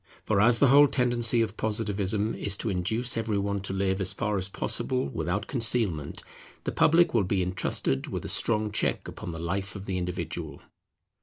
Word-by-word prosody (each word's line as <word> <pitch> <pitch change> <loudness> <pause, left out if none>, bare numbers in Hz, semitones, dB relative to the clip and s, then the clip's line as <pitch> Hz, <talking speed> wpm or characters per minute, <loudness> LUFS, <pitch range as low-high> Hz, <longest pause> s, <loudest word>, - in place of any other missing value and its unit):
For 100 - +2
as 115 +2 +5
the 140 - +4
whole 145 +2 +7
tendency 120 -3 +2
of 110 -1 -5
Positivism 105 -1 -1
is 100 -1 -2
to 110 - -2
induce 110 +7 0
every 110 -2 -1
one 100 0 -1
to 95 - -4
live 95 0 -1
as 95 +1 +1
far 105 -1 -2
as 95 +1 -4
possible 70 -8 -1
without 95 +8 -2
concealment, 110 - 0 0.4
the - - -2
public 170 +2 +4
will 115 -4 +3
be 95 0 0
intrusted 90 -7 0
with - - -5
a - - -3
strong 110 -2 0
check 105 - -1
upon 85 - -7
the 80 - -7
life 95 +5 -3
of 100 -1 -7
the 95 -2 -2
individual. 90 0 -5
100 Hz, 185 wpm, -27 LUFS, 95-115 Hz, 0.4 s, whole